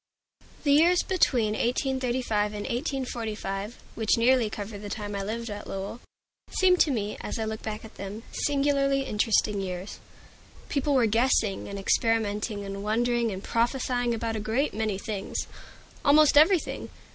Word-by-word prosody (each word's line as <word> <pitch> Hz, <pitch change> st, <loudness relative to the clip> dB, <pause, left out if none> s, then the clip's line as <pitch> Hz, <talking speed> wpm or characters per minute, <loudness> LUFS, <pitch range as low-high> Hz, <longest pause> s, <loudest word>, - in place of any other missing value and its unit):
THE 285 Hz, -, +3 dB
years 345 Hz, +4 st, +5 dB
between 250 Hz, -, +2 dB
1835 245 Hz, -3 st, 0 dB
and 205 Hz, -, -4 dB
1845, 235 Hz, -5 st, -3 dB, 0.2 s
which 220 Hz, 0 st, +1 dB
nearly 240 Hz, -1 st, +4 dB
cover 205 Hz, 0 st, -6 dB
the 205 Hz, 0 st, -7 dB
time 205 Hz, -1 st, -5 dB
I 200 Hz, -, -2 dB
lived 225 Hz, +3 st, -4 dB
at 205 Hz, 0 st, -7 dB
Lowell, 195 Hz, +4 st, -5 dB, 0.5 s
seem 370 Hz, -1 st, +4 dB
to 320 Hz, -, +4 dB
me, 210 Hz, -6 st, -2 dB
as -, -, -4 dB
I 220 Hz, -, -2 dB
look 220 Hz, 0 st, -4 dB
back 215 Hz, 0 st, -5 dB
at 220 Hz, -, -14 dB
them, 200 Hz, +3 st, -6 dB
singularly 275 Hz, -1 st, +1 dB
interesting 210 Hz, -3 st, +1 dB
years. 185 Hz, 0 st, -5 dB, 0.7 s
People 280 Hz, 0 st, +1 dB
were 250 Hz, -3 st, +4 dB
guessing 225 Hz, -2 st, +2 dB
and 200 Hz, -, -6 dB
experimenting 210 Hz, 0 st, 0 dB
and 195 Hz, 0 st, -5 dB
wondering 235 Hz, +2 st, +1 dB
and 190 Hz, 0 st, -6 dB
prophesying 245 Hz, 0 st, 0 dB
about 225 Hz, 0 st, -2 dB
a -, -, -2 dB
great 225 Hz, +7 st, 0 dB
many 215 Hz, -2 st, -1 dB
things, 200 Hz, -1 st, -4 dB
about -, -, -18 dB
almost 295 Hz, +1 st, +6 dB
everything. 325 Hz, +4 st, +4 dB
225 Hz, 155 wpm, -27 LUFS, 210-260 Hz, 0.7 s, almost